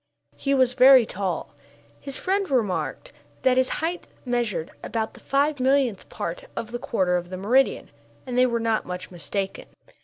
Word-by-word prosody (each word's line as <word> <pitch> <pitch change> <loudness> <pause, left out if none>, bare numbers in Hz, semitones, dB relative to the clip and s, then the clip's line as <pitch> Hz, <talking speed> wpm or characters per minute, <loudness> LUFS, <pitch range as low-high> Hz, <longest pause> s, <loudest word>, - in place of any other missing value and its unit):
He 275 0 0
was 255 -2 +3
very 260 -1 +8
tall. 190 -4 -3 0.5
His 275 - -6
friends 390 +1 0
remarked 250 - -1 0.3
that 255 -1 +4
his 260 0 +3 0.2
height 350 +2 -4 0.2
measured 240 -9 -1
about 220 -1 -3
the - - -14
five 285 +1 +1
millionth 260 -5 +1
part - - -5
of 230 0 -5
the 240 - -4
quarter 185 -7 +1
of 175 0 -5
the 185 - -5
meridian, 245 +8 +2 0.3
and 250 -2 -4
they 255 0 +5
were 235 -1 0
not 225 -1 +1
much 180 0 -6
mistaken. 190 +2 -4
245 Hz, 165 wpm, -25 LUFS, 200-270 Hz, 0.5 s, very